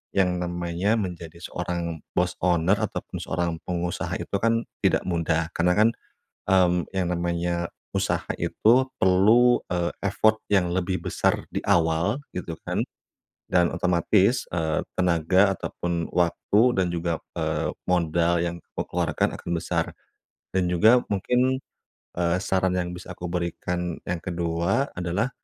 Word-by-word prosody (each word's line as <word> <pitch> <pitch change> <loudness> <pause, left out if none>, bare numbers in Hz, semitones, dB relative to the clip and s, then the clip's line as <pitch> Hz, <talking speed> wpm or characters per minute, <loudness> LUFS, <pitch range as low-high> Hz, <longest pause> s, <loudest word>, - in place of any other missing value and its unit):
yang 90 -2 +2
namanya 85 +3 -1
menjadi 85 -5 -5
seorang 85 -2 -3 0.2
bos 90 0 +1
owner, 90 +2 +2
ataupun - - -4
seorang 85 +1 -1 0.2
pengusaha 90 -1 -2
itu - - -8
kan 115 +2 +2 0.2
tidak - - +2
mudah, 85 -1 0
karena 90 +1 +2
kan, 110 +2 +6 0.6
mmm, 90 -2 +3
yang 95 -2 0
namanya 85 0 -1 0.4
usaha - - -1
itu 125 +4 +3 0.2
perlu, 110 +7 +5
eee, 85 -1 -1 0.2
effort 110 +2 +3
yang 95 -4 +2
lebih 90 +1 -1
besar - - +1
di - - -2
awal 85 - +2
gitu 85 -2 -5
kan, - - -3 0.7
dan 90 -1 +4
otomatis, 95 +6 +2
eee, 80 -2 0 0.2
tenaga 90 +2 +3
ataupun 85 -2 -3
waktu 90 +4 +2 0.2
dan 90 - +2
juga, 85 -1 -1 0.2
eee, - - -1
modal 85 -1 +2
yang 85 0 -1 0.2
kamu - - -3
keluarkan - - 0
akan - - -8
besar. 85 -1 0 0.7
Dan 95 -2 +1
juga 110 +8 +5
mungkin, 125 +6 +1 0.6
eee, 85 0 +2
saran 95 -1 +1
yang 90 -1 -1
bisa 90 +1 -8
aku 90 0 -6
berikan 90 0 -2
yang 90 0 -3
ke-2 85 - -1
adalah, 90 +8 -1
90 Hz, 135 wpm, -25 LUFS, 85-95 Hz, 0.7 s, kan